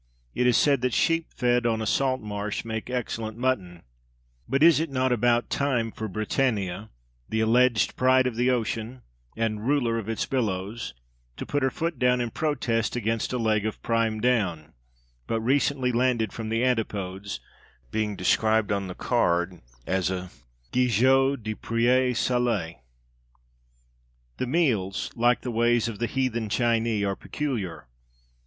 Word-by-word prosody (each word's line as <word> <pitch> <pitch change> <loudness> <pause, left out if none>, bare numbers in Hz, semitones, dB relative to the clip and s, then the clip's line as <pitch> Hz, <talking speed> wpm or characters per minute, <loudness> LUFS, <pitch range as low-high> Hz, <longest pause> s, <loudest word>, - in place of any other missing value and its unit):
It 125 - +1
is 125 - +4
said 140 -4 +3
that 125 -1 0
sheep 165 0 +2
fed 120 -1 +1
on 110 -1 0
a 110 - -2
salt 130 +3 +1
marsh 105 0 -4
make 110 +1 -4
excellent 115 -3 -3
mutton; 100 -9 -2 0.7
but 135 +4 +2
is 165 -2 +7
it 165 0 -1
not 130 -1 0
about 120 0 +2
time 125 -5 0
for 110 - -5
Britannia, 110 -1 -1 0.4
the 110 - 0
alleged 120 +1 +3
pride 130 0 +4
of 125 -3 -1
the 125 +2 +2
ocean, 120 0 -2 0.3
and 110 0 -1
ruler 120 -5 +1
of 110 -1 -6
its 115 - -1
billows, 105 - -2 0.4
to - - -5
put 145 - -1
her 130 - +2
foot 165 +4 -3
down 125 0 +3
and 120 -2 -3
protest 125 -8 -1
against 115 -1 -1
a 125 - -1
leg 110 -3 +1
of 110 0 -3
"prime 115 -1 0
Down" 95 -10 0 0.5
but 115 - 0
recently 130 +1 +1
landed 120 -3 +1
from 110 -1 -5
the 115 +2 0
Antipodes 100 -5 -2 0.5
being 105 -2 -1
described 110 +1 +2
on 100 -1 -1
the 90 - -7
card 90 -7 0 0.2
as 95 -1 0
a 90 -1 -4 0.4
Gigot 130 +2 +3
de 110 0 -2
pré 120 +4 +2
salé? 115 -9 0 1.6
The 130 - -2
meals, 120 - 0
like 120 +1 +2
the 125 - -4
ways, 120 0 +2
of 115 -3 -6
the 120 - 0
"Heathen 120 -5 -1
Chinee" 115 -2 +1
are 100 0 -1
peculiar. 115 - -4
115 Hz, 155 wpm, -26 LUFS, 110-125 Hz, 1.6 s, is